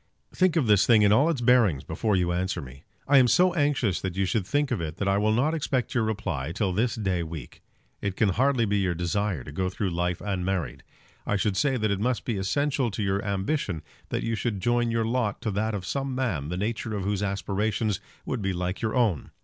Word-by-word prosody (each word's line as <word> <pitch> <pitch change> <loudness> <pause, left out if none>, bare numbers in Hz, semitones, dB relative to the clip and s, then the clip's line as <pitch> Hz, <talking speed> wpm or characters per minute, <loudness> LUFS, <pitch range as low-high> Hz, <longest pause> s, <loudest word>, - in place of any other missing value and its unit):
Think 185 -3 +2
of 160 -6 +2
this 105 -3 +4
thing 110 -3 +6
in 100 - +5
all 140 +9 +4
its 150 -7 -1
bearings 115 - +4
before 105 -3 -1
you 90 -1 +1
answer 90 0 -1
me. 70 -1 -11 0.2
I 140 -1 +6
am 125 - +5
so 180 +7 +4
anxious 145 - +1
that 95 -2 -3
you 95 - +2
should 95 0 -1
think 145 +5 0
of - - 0
it 80 -1 -5
that 100 - -2
I 100 0 +3
will 105 +1 +2
not 135 +8 +2
expect 135 -5 -1
your 120 - +2
reply 95 -10 -2
till 100 -1 0
this 115 +6 +1
day 95 -6 -1
week. 80 -6 -8 0.4
It 100 -2 -2
can 105 - +2
hardly 125 +4 +2
be 100 -1 +1
your 90 -3 0
desire 90 -2 -1
to 70 - -9
go 95 +5 -1
through 95 0 -2
life 90 +1 -1
unmarried. 95 -8 -2 0.5
I - - +1
should 100 0 0
say 135 +3 +2
that 110 -3 0
it 100 - 0
must 120 +3 -1
be 115 -4 -1
essential 135 +6 0
to 105 0 -3
your 100 0 0
ambition 100 - -2 0.3
that - - -2
you 115 - -1
should 110 -2 -2
join 120 +3 +1
your 115 -1 0
lot 115 -3 -1
to 110 - -1
that 110 +2 -1
of 95 -3 -5
some 135 +3 -2
man 100 - -1
the 90 - -3
nature 110 +2 -2
of 100 - -3
whose 100 0 -1
aspirations 105 +1 -1 0.3
would 115 - -3
be 95 -1 -1
like 90 +1 -2
to 115 - -1
your 110 - -3
own. 110 - +1
105 Hz, 240 wpm, -26 LUFS, 95-120 Hz, 0.5 s, thing